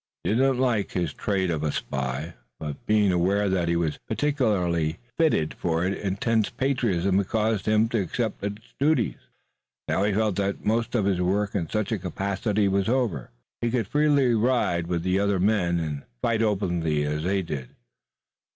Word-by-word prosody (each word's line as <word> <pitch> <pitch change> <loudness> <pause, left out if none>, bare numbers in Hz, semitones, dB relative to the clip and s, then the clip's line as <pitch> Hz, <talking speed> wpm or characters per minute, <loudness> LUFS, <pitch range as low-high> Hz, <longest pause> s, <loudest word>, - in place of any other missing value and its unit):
He - - 0
did 110 - +2
not 135 0 +3
like 120 -5 0
his 85 -5 -1
trade 95 -4 -1
of 80 -3 -1
a 75 -1 0
spy, 65 +6 -3 0.3
but 75 -3 -7
being 105 -2 +4
aware 95 +4 +2
that 95 -3 +1
he 85 - +1
was 80 -3 -1
peculiarly 105 - +1 0.2
fitted 150 - +2
for 85 0 -1
it 95 - 0
intense 105 +3 0
patriotism 115 -8 +1
had 100 - -1
caused 110 -2 0
him 110 +1 +4
to 115 -3 +1
accept 110 +3 -3
its 105 +2 -6
duties. 140 -5 +2 0.7
Now - - +1
he 105 - +2
felt 105 -1 +1
that 100 0 -2
most 115 +3 0
of 105 -5 +2
his 95 -3 +1
work 100 +3 0
in 85 -6 -2
such 110 0 -1
a 110 - 0
capacity 100 +3 -1
was 95 +1 +1
over. 115 - 0 0.3
He 120 - +1
could 115 -2 0
freely 145 -2 +3
ride 110 -8 +1
with 85 -1 -1
the 95 +1 +1
other 100 -1 +1
men 90 -3 +2
and 75 -3 -3 0.2
fight 115 -1 +1
openly 85 -8 0
as 75 +1 -1
they 95 +3 0
did. 70 -7 -5
100 Hz, 180 wpm, -25 LUFS, 85-110 Hz, 0.7 s, being